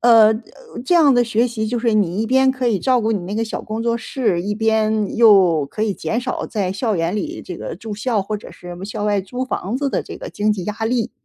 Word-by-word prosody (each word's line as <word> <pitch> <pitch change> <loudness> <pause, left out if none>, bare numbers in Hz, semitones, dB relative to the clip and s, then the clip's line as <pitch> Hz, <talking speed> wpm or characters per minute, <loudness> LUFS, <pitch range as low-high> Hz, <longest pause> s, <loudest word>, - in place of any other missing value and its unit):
呃， 225 -2 +6 0.5
这 355 - 0
样 300 -6 +6
的 245 - +4
学 235 +1 +1
习 220 -2 -3
就 240 0 -1
是 230 -1 +1
你 200 -2 +1
一 225 - 0
边 265 +2 +4
可 255 -1 -2
以 215 -6 +1
照 255 -2 +2
顾 225 0 0
你 205 - -1
那 180 +3 -6
个 225 - 0
小 220 - -5
工 220 +1 -5
作 235 0 +1
室， 225 -7 -1
一 205 +3 -2
边 220 -1 +1
又 190 -9 +5
可 210 +9 -5
以 205 - -1
减 225 +5 -2
少 255 +1 -3
在 195 -4 -2
校 215 0 -1
园 165 +3 -1
里 210 - -4
这 180 - -8
个 - - -6
住 215 +3 -7
校 215 +1 0
或 210 +2 -3
者 210 - -11
是 175 0 -10
校 205 0 -4
外 205 -1 +1
租 245 +7 -4
房 235 -3 -3
子 280 +1 -1
的 - - -1
这 - - -9
个 - - -8
经 210 +1 0
济 185 -4 -4
压 210 - -2
力。 235 0 0
220 Hz, 280 characters per minute, -20 LUFS, 205-240 Hz, 0.5 s, 呃